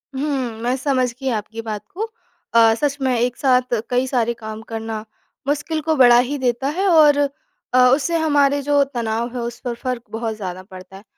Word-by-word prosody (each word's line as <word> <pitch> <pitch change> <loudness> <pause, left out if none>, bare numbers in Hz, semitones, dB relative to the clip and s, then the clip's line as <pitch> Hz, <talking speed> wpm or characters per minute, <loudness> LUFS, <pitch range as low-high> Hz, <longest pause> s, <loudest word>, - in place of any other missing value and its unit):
हुँ, 265 -5 -2
मैं 245 +2 0
समझ 255 -2 0
गई 270 -1 -2
आपकी 225 +1 -4
बात 215 -2 -5
को। 430 +5 -2 0.5
अ, 225 -1 +6
सच 285 +3 -1
में 255 -2 +1
एक 245 +1 0
साथ 255 -2 +2 0.2
कई 250 +1 +1
सारे 235 -3 0
काम 220 0 -6
करना 225 -1 -4 0.4
मुश्किल 310 +2 -1
को 315 +1 0
बढ़ा 245 -3 +7
ही 290 - -2
देता 255 +1 -1
है, 395 - +2
और 305 -4 +6 0.6
अ, - - +4 0.2
उससे 330 +4 -1
हमारे 285 -3 +2
जो 285 0 +3
तनाव 235 -3 -2
हैं 245 - -3
उस 235 0 -5
पर 240 - -1
फ़र्क 250 -3 -3
बहुत 225 0 -3
ज़्यादा 185 -3 -6
पड़ता 185 +1 -11
है। 200 - -15
250 Hz, 195 wpm, -20 LUFS, 225-280 Hz, 0.6 s, बढ़ा